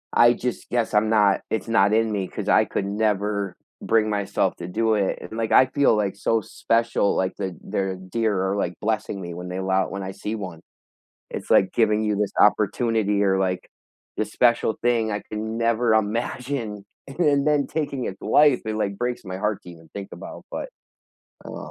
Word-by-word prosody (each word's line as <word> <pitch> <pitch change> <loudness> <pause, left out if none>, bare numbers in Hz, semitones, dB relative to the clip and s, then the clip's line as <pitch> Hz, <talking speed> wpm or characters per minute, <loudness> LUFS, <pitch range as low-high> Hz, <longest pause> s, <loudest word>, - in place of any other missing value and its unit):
I 120 0 +7
just 125 0 -4
guess 120 -2 0
I'm 105 +1 +3
not 105 -3 +3
it's 110 0 -2
not 105 -3 +3
in 110 0 +3
me 100 -3 -2
'cause - - -6
I - - +5
could 95 - -3
never 100 -2 -1 0.3
bring 110 -1 +2
myself 100 -1 0
to 85 - -6
do 110 +3 +1
it, 100 -3 0
and, 110 - -8
like, 115 -1 -2
I 130 - +7
feel, 135 0 +2
like, 100 -2 -1
so 110 +2 +1
special, 115 0 0
like, 95 0 0
the 95 -4 -4
there 95 -1 -2
are - - -4
deer 95 +2 -1
are, - - 0
like, 90 -3 -2
blessing 110 -2 -2
me 85 -1 -6
when 90 +1 -7
they 90 - -4
allow 95 0 0
when 100 0 -5
I 95 - -5
see 105 +3 -5
1. 90 -6 -7 0.7
It's - - -6
like 95 - +4
giving 110 -2 +2
you 105 -1 0
this 105 -1 -1
opportunity 105 0 +2
or, 95 -1 +2
like, 90 -1 -2 0.5
this - - -2
special 120 -2 +2
thing 115 -2 +1
I 105 - -3
can 110 +1 -4
never 115 0 +2
imagine 115 0 -2 0.2
and 135 +3 -11
then 145 -5 +3
then 150 -2 +2
taking 140 -5 -2
its 95 - -6
life, 145 -4 +4
it, 110 - -2
like, 100 -2 -2
breaks 125 -1 -2
my 95 -1 -5
heart 105 +1 -2
to 90 - -11
even 80 -2 -15
think 100 -1 -6
about, - - -9
but - - -4 0.8
I - - -8
don't - - -8
know. - - -8
105 Hz, 205 wpm, -24 LUFS, 95-115 Hz, 0.8 s, I